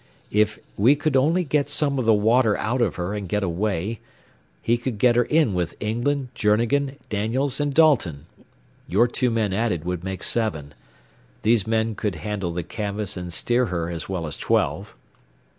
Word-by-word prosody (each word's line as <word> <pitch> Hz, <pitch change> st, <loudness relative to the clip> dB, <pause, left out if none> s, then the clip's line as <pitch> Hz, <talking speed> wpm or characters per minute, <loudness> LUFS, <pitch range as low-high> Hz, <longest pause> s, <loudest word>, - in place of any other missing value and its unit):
If 105 Hz, +1 st, +2 dB, 0.2 s
we 120 Hz, +8 st, +5 dB
could 150 Hz, -1 st, -1 dB
only 160 Hz, +7 st, +3 dB
get 145 Hz, -2 st, 0 dB
some 145 Hz, -2 st, +2 dB
of 125 Hz, -, -1 dB
the 110 Hz, -, +5 dB
water 110 Hz, +1 st, +3 dB
out 120 Hz, +4 st, -1 dB
of 120 Hz, -, +1 dB
her 90 Hz, +3 st, -3 dB
and 100 Hz, -3 st, -5 dB
get 105 Hz, +2 st, 0 dB
away, 100 Hz, +3 st, -2 dB, 0.6 s
he 120 Hz, -, +1 dB
could 120 Hz, -1 st, -4 dB
get 120 Hz, +2 st, +4 dB
her 120 Hz, 0 st, +3 dB
in 155 Hz, -9 st, +2 dB
with 90 Hz, -2 st, -2 dB
England, 125 Hz, +5 st, -1 dB
Journegan, 120 Hz, +6 st, +1 dB
Daniels, 120 Hz, +7 st, 0 dB
and 145 Hz, 0 st, 0 dB
Dalton. 125 Hz, -, +3 dB, 0.6 s
Your 120 Hz, -, +3 dB
two 125 Hz, +1 st, 0 dB
men 110 Hz, -4 st, 0 dB
added 100 Hz, -6 st, -1 dB
would 90 Hz, -1 st, -3 dB
make 95 Hz, -1 st, -4 dB
seven. 80 Hz, -11 st, -1 dB, 0.7 s
These 110 Hz, -2 st, +2 dB
men 110 Hz, 0 st, +1 dB
could 105 Hz, -3 st, -3 dB
handle 100 Hz, 0 st, -3 dB
the 85 Hz, +1 st, -3 dB
canvas 105 Hz, +1 st, -3 dB
and 90 Hz, -1 st, -6 dB
steer 120 Hz, +7 st, +1 dB
her 85 Hz, -3 st, -3 dB
as 85 Hz, +1 st, -5 dB
well 90 Hz, -4 st, -3 dB
as 75 Hz, -, -3 dB
twelve." -, -, -1 dB
110 Hz, 175 wpm, -23 LUFS, 95-125 Hz, 0.7 s, we